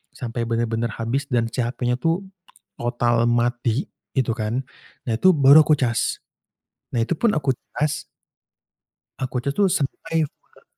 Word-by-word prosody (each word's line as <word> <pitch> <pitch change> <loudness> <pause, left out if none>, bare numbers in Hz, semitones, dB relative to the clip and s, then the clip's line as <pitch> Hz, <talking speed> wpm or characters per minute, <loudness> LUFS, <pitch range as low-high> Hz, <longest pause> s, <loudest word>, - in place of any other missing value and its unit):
sampai 120 -2 -4
benar-benar 115 0 -1
habis 125 +5 -2
dan 120 -3 +2
si - - -5
HP-nya 125 +1 -1
tuh 165 +3 0 0.6
total 120 -1 +1
mati 120 +1 +1 0.3
itu 125 -3 +2
kan, 115 +4 -1 0.4
nah, 115 - -1
itu 185 +9 +6
baru 140 +2 +8
aku 155 - +5
cas. 120 -4 0 0.7
Nah, 120 - +2
itu 145 - -1
pun 230 -3 +3
aku 140 -3 +1 0.2
cas 150 0 -1 1.2
Aku 130 -1 -2
cas 140 +3 -2
tuh 200 -2 +3
sampai 160 +2 -1
full. - - -27
125 Hz, 145 wpm, -23 LUFS, 120-145 Hz, 1.2 s, baru